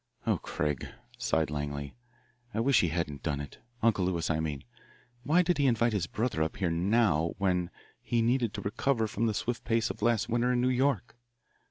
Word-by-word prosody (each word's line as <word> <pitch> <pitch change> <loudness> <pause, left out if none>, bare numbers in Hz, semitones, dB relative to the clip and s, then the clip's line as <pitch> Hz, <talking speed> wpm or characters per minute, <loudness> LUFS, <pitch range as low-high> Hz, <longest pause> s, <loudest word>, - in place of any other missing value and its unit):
Oh, - - +1
Craig," 75 -3 -2 0.3
sighed 80 -10 +1
Langley, 70 -1 -4 0.6
"I - - 0
wish 135 +2 +4
he 85 - +2
hadn't 80 -3 -2
done 75 -3 -1
it 70 -1 -8 0.2
Uncle 110 -5 +3
Lewis, 85 -2 0
I 80 - 0
mean. 75 -3 -3 0.6
Why 160 +7 +4
did 175 -3 +1
he 140 - +4
invite 115 -1 +2
his 95 -4 0
brother 110 -6 -1
up 80 0 -1
here 90 -4 0
now 85 -2 +2
when 90 -3 +1 0.3
he 115 -1 0
needed 120 -1 +2
to 100 - -4
recover 110 +4 0
from 110 +2 -1
the 110 - 0
swift 120 +2 -2
pace 115 -1 +1
of - - -11
last 115 -1 +2
winter 120 +2 +1
in 125 - +1
New 125 +1 +2
York? 125 -4 +1
105 Hz, 195 wpm, -30 LUFS, 80-120 Hz, 0.6 s, wish